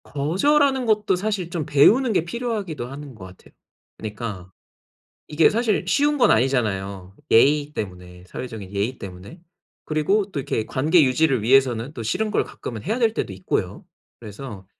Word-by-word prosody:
거절하는 265 - +1
것도 210 -3 +2
사실 195 -2 -2
좀 170 -4 -3
배우는 210 - +4
게 170 - +1
필요하기도 205 - -4
하는 140 +1 -9
것 95 -4 -11
같아요. 95 0 -16 0.4
그러니까 105 -4 -6 0.8
이게 155 +1 +4
사실 225 -1 0
쉬운 295 +1 +2
건 245 -5 +4
아니잖아요. 100 -6 0
예의 145 +5 +4
때문에 90 -4 -7
사회적인 110 -2 -8
예의 105 +6 -2
때문에. 95 - -10 0.4
그리고 190 +7 0
또 - - -3
이렇게 115 -4 -2
관계 155 +6 +3
유지를 135 -2 +2
위해서는 125 +1 +2
또 120 - -6
싫은 210 - -1
걸 - - +1
가끔은 110 -3 -8
해야 220 - -2
될 225 -3 +2
때도 100 - -3
있고요. 95 -1 -3 0.4
그래서 105 -2 -9
140 Hz, 355 characters per minute, -22 LUFS, -, 0.8 s, 배우는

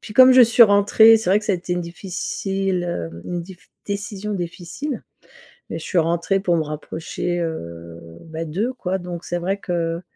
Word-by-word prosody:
puis 210 - -10
comme 255 0 +9
je 255 -1 +8
suis 235 +1 +6
rentrée, 205 +2 +6
c'est 220 -4 -4
vrai 200 - +5
que - - -10
ça - - +1
a - - +1
été 175 0 -5
une 175 - -2
difficile, 190 +1 -3
heu, 85 - -5
une 175 -1 -3
diff 180 0 -12 0.3
une 200 - 0
décision 205 +1 -5
difficile, 180 - -5 0.7
mais - - -4
je - - -9
suis 185 - -2
rentrée 170 +4 +1
pour 175 -3 +1
me 160 - +1
rapprocher, 160 +3 -4
heu, 85 - -6 0.3
bah, 160 0 -5
d'eux, 200 +11 -2
quoi, 190 -6 -2
donc 175 -1 -7
c'est 175 - -2
vrai 190 +3 -1
que 170 -3 -2
180 Hz, 200 wpm, -21 LUFS, 170-200 Hz, 0.7 s, comme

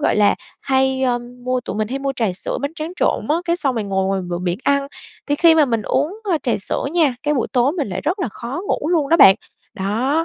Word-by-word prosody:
gọi - - +1
là, 205 -1 +4 0.3
hay, 265 0 +1
ơm, 245 -1 -2
mua 255 0 0
tụi 245 - -6
mình 215 0 -1
hay 265 +3 -3
mua 275 0 -2
trà 220 -6 0
sữa, 180 - -4
bánh 285 +4 -3
tráng 320 +1 -5
trộn - - 0
á, 305 - +3
cái 340 0 +1
xong 275 -7 -1
rồi 225 -3 -2
ngồi 190 -1 0
ngoài 195 0 0
bờ 175 - -2
biển 175 0 -2
ăn, 280 0 +2 0.4
thì 290 - +1
khi 330 +2 +5
mà 315 -2 +5
mình 230 -5 -1
uống, 295 - -1
a, 325 - +2
trà 255 -4 -1
sữa - - -2
nha, 320 -7 +3
cái 295 0 +1
buổi 255 - -1
tối 255 +2 +3
mình 310 - -2
lại 180 - -3
rất 340 +7 -1
là 360 - -1
khó 240 - -6
ngủ 300 - -1
luôn 320 -5 +1
đó 330 - +5
bạn. 195 - +9 0.4
Đó, 240 +11 0
265 Hz, 265 wpm, -20 LUFS, 220-300 Hz, 0.4 s, bạn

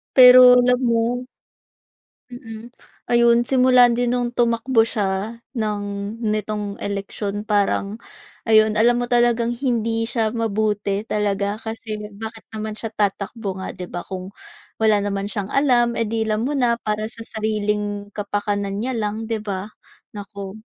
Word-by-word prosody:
Pero 255 -1 +10
alam 250 0 +4
mo. 240 +1 0 1.0
Mm, 230 -1 -10 0.4
ayun, 235 0 +5
simula 250 -1 +5
din 245 +1 0
nung 245 -1 -1
tumakbo 235 0 +2
siya 210 +1 -2 0.2
ng 210 -2 -1 0.4
nitong 210 -1 -2
eleksyon 200 0 -4
parang, 205 0 0 0.5
ayun, 215 -1 +4
alam 240 +2 +4
mo 245 - -2
talagang 240 -1 +2
hindi 230 -3 0
siya 225 -2 0
mabuti 210 -3 -1
talaga 205 -1 -1
kasi 220 -1 -6 0.2
bakit 220 +2 -8
naman 215 0 -5
siya 225 - -5
tatakbo 200 0 -2
nga 190 - -6
di 180 -1 -7
ba 175 - -5
kung 185 0 -6 0.5
wala 220 -1 +4
naman 200 0 -2
siyang 205 -2 -4
alam 245 -4 +2
eh, 230 - 0
di 225 +1 -1
alam 220 +1 -1
mo 285 - -1
na 240 -3 +1
para 215 -1 -2
sa 230 - -9
sariling 210 -2 -2
kapakanan 205 -1 -2
niya 255 +4 -2
lang 220 0 -3
di 225 -1 -2
ba? 195 -2 -4 0.5
Naku. 200 0 -8
220 Hz, 140 wpm, -21 LUFS, 205-235 Hz, 1.0 s, Pero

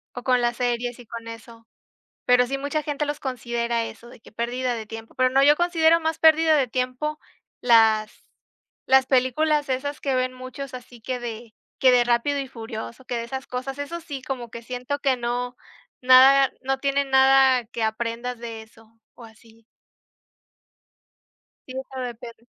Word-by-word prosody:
o 245 - -6
con 250 -1 +2
las 240 0 0
series 245 -1 -1
y 240 - -12
con 230 +1 -9
eso. 230 0 -11 0.6
Pero 250 0 +4
sí, 275 +2 -2
mucha 285 +3 -2
gente 295 0 -2
los 290 +1 -4
considera 235 -2 -2
eso, 225 +1 -9
de 240 - -15
que - - -17
pérdida 245 +2 -2
de 220 -1 -6
tiempo, 225 +1 -10
pero 255 0 +2
no, 270 +2 +3
yo 295 +1 +6
considero 335 -1 +3
más 320 0 -2
pérdida 320 0 +5
de 275 -3 +2
tiempo 255 +5 -3 0.4
las 220 -3 +3 0.6
las 265 0 +5
películas 285 +3 +1
esas 285 +3 -3
que 270 -2 0
ven 255 0 0
muchos 255 +1 -8
así 245 -1 -12
que 255 +2 -4
de 230 -1 -7 0.3
que 260 - +6
de 245 -1 +5
Rápido 245 +4 +1
y 275 - -4
furioso, 225 +1 -8
que 240 - -3
de 230 - -3
esas 265 +2 -6
cosas, 260 +2 -5
eso 310 +4 -5
sí 280 -4 -7
como 245 -4 -5
que 235 - -9
siento 250 +4 -4
que 270 -3 +1
no 245 +1 -3 0.4
nada 260 +1 +7
no 270 0 -1
tiene 280 0 +1
nada 265 -2 +5
que 230 0 -5
aprendas 230 +2 -3
de 230 -2 -7
eso 225 0 -22 0.2
o 240 - -13
así. 225 0 -20 2.0
Sí, 255 - -8
eso 265 0 -9
depende. 235 -1 -8
250 Hz, 175 wpm, -24 LUFS, 235-270 Hz, 2.0 s, nada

